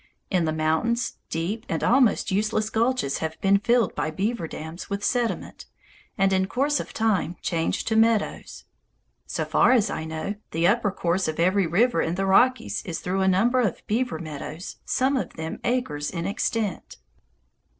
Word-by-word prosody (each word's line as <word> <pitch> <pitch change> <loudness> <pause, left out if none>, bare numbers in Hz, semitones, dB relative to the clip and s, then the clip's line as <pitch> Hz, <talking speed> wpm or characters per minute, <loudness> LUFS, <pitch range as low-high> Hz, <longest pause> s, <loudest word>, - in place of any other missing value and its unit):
In 180 -4 +2
the 155 - 0
mountains, 160 +10 0
deep 185 +8 -2
and - - -2
almost 240 -4 +3
useless 215 +2 0
gulches 230 - 0
have 160 0 -4
been 200 0 +4
filled 235 -1 +2
by - - -2
beaver 190 +2 -2
dams 160 +3 -8
with 200 0 -3
sediment, 240 -3 -2 0.5
and 195 -1 +3
in 190 0 +2
course 280 +7 +1
of - - -6
time 210 -6 0
changed 165 -2 -1
to 220 - +1
meadows. 225 -1 +1 0.6
So - - -2
far - - +4
as 220 -5 +3
I 160 - -4
know, 160 +6 -4
the 165 +1 0
upper 205 +3 +3
course 180 0 0
of 155 0 -3
every 185 +2 +3
river 195 +2 +2
in 165 - -1
the 195 +1 -1
Rockies 190 - +3
is 170 -3 -4
through 190 +2 -1
a 190 - +2
number 225 +7 +3
of 215 -7 -2
beaver 235 -4 -1
meadows, 155 +2 -7
some 265 +2 +1
of 260 - -2
them 160 0 -5
acres 240 -13 -1
in 170 -2 -4
extent. 205 -1 -2
195 Hz, 170 wpm, -25 LUFS, 165-230 Hz, 0.6 s, been